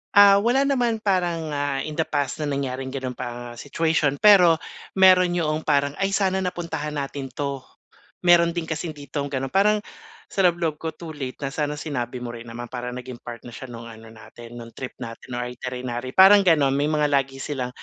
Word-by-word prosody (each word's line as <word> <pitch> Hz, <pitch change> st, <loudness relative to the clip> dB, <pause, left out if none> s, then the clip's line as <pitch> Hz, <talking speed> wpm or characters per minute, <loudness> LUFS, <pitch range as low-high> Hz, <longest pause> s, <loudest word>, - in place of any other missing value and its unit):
Ah, 200 Hz, -1 st, +8 dB
wala 240 Hz, +6 st, +2 dB
naman 240 Hz, -5 st, 0 dB
parang, 175 Hz, -5 st, 0 dB
ah, 145 Hz, -1 st, -1 dB
in 155 Hz, -, -5 dB
the 160 Hz, -, 0 dB
past 145 Hz, -1 st, -2 dB
na 150 Hz, -, -2 dB
nangyaring 135 Hz, -2 st, -3 dB
ganong 130 Hz, -2 st, -4 dB
pa 120 Hz, -1 st, -7 dB
situation 155 Hz, 0 st, 0 dB
pero 185 Hz, -6 st, +7 dB, 0.4 s
meron 185 Hz, -2 st, +6 dB
yo'ong 155 Hz, -2 st, -1 dB
parang 140 Hz, -1 st, +2 dB
ay 195 Hz, 0 st, +1 dB
sana 190 Hz, -1 st, +1 dB
napuntahan 170 Hz, -5 st, -4 dB
natin 140 Hz, -1 st, -4 dB
'to. 140 Hz, +1 st, -4 dB, 0.7 s
Meron 170 Hz, -1 st, +5 dB
din 170 Hz, -, -1 dB
kasing 160 Hz, 0 st, -4 dB
ditong 145 Hz, 0 st, -4 dB
gano'n 135 Hz, -1 st, -3 dB
parang 210 Hz, +2 st, +4 dB, 0.5 s
sa 195 Hz, -, -4 dB
loob-loob 170 Hz, -4 st, +1 dB
ko 160 Hz, -, -3 dB
too 165 Hz, -2 st, -8 dB
late 135 Hz, -4 st, -6 dB
na 135 Hz, -, -3 dB
sana 150 Hz, -1 st, -2 dB
sinabi 130 Hz, -5 st, -4 dB
mo 120 Hz, -1 st, -5 dB
rin 115 Hz, 0 st, -9 dB
naman 120 Hz, +1 st, -7 dB
para 125 Hz, -1 st, -4 dB
naging 125 Hz, 0 st, -7 dB
part 120 Hz, -1 st, -9 dB
na 120 Hz, -, -10 dB
siya 130 Hz, +2 st, -9 dB
no'ng 115 Hz, -1 st, -9 dB
ano 115 Hz, -1 st, -12 dB
natin 115 Hz, +1 st, -13 dB
no'ng 115 Hz, -1 st, -10 dB
trip 130 Hz, -, -8 dB
natin 120 Hz, +1 st, -8 dB
o 125 Hz, -, -2 dB
iterinary. 125 Hz, 0 st, -5 dB
Parang 195 Hz, +2 st, +9 dB
gano'n 155 Hz, -7 st, +3 dB
may 145 Hz, +2 st, +1 dB
mga 150 Hz, -1 st, +1 dB
lagi 135 Hz, -1 st, +1 dB
silang 135 Hz, -2 st, -4 dB
145 Hz, 195 wpm, -23 LUFS, 125-175 Hz, 0.7 s, Parang